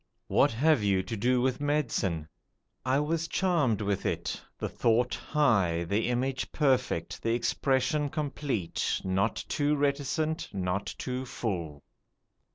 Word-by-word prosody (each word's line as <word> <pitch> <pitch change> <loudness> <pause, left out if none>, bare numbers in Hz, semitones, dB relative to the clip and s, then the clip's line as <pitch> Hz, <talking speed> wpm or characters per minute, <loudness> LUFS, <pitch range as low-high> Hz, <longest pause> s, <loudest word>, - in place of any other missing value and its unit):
What - - +3
have 150 +2 +3
you 100 -2 +2
to 105 +5 -4
do 125 +4 +2
with 130 +1 0
medicine? 115 - 0 0.6
I 130 +2 +2
was 160 +2 0
charmed 150 - +1
with 100 -2 -1
it: - - -2 0.2
the - - -2
thought 120 +2 +1
high, 100 - +2
the 105 +7 0
image 130 +2 -1
perfect, 130 - 0
the 115 0 +1
expression 135 +5 +1
complete; 140 - -2
not 95 +4 +1
too 145 0 +1
reticent, 145 +3 0
not 95 +1 -1
too 125 0 -3
full. 85 -12 -4
125 Hz, 130 wpm, -29 LUFS, 100-145 Hz, 0.6 s, What